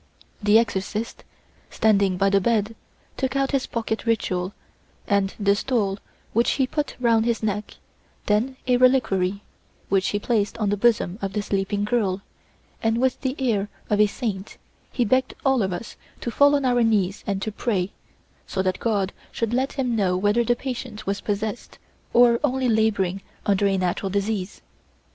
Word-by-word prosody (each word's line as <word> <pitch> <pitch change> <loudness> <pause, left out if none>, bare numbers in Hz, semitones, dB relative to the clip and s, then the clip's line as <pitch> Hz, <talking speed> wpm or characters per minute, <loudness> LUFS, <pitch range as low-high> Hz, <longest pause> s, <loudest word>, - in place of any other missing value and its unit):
The 205 +1 +5
exorcist, 220 0 -2 0.5
standing 200 -4 +2
by 195 +1 +2
the 200 0 +4
bed, 225 +1 +1 0.4
took 265 0 -1
out 275 0 +1
his 275 -2 0
pocket 225 -1 -3
ritual 185 -5 0 0.5
and 200 -1 +1
the 200 -1 +3
stole 205 -4 0 0.3
which 235 +2 +3
he 270 - +2
put 295 +3 -3
round 230 -2 +3
his 235 -1 0
neck, 210 0 -2 0.5
then 230 +6 +1
a 250 -1 +3
reliquary, 205 -7 +2 0.5
which 195 0 +2
he 205 - 0
placed 210 0 0
on 210 -3 0
the - - +2
bosom 205 -3 +1
of 195 -1 -3
the 210 0 -1
sleeping 200 +1 -1
girl, 205 -4 0 0.6
and 225 0 +1
with 255 +1 +1
the 260 -1 -1
air 215 -6 0 0.2
of 210 0 +4
a 210 - +6
saint 205 -3 -4 0.3
he 245 - +1
begged 260 +4 +1
all 265 -3 +3
of 190 -2 0
us 180 +5 -6 0.2
to 235 - -3
fall 285 +4 +5
on 280 -2 0
our 245 -1 +3
knees 205 -4 +1
and 200 -2 0
to 215 - -2
pray, 200 -3 -1 0.6
so 190 - -1
that 185 0 -1
God 200 -4 0 0.2
should 230 0 -2
let 260 +2 0
him 255 -4 -1
know 185 -4 +1
whether 205 +5 +2
the 240 +1 +2
patient 245 -4 -6
was 200 0 -2
possessed 210 +2 -3 0.3
or 235 -1 +5
only 265 -2 +1
labouring 205 -4 +1 0.2
under 200 0 +3
a 195 -1 +1
natural 185 +1 -1
disease. 200 0 -2
215 Hz, 170 wpm, -24 LUFS, 195-240 Hz, 0.6 s, a